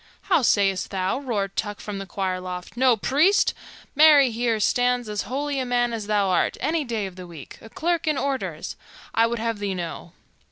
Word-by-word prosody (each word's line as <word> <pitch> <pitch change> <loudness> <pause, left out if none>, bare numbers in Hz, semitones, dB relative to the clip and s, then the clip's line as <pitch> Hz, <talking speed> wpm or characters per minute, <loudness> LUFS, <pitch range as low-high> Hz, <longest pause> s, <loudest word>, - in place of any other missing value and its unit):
"How - - +5
sayst 195 -5 +2
thou?" 190 +4 -1
roared 205 -8 -3
Tuck 205 -2 -3
from 205 -2 -6
the 195 - -7
choir 185 0 -2
loft. 180 +1 -7
"No 250 -1 +4
priest? 305 - +3 0.4
Marry, 295 -3 +6
here 230 -1 0
stands 245 +2 +1
as 210 -1 -2
holy 280 +1 -2
a - - 0
man 245 -1 0
as 215 -3 -4
thou 205 -2 +1
art, 180 - +1
any 310 +3 0
day 230 -5 -3
of 190 -1 -9
the 180 -1 -9
week, 160 -6 -11
a 225 - -12
clerk 340 +5 -1
in 305 -2 +1
orders, 275 -1 -3 0.4
I 230 0 +4
would 235 +1 -2
have 230 -1 -2
thee 200 -2 -2
know. 170 -1 -6
225 Hz, 200 wpm, -24 LUFS, 195-265 Hz, 0.4 s, Marry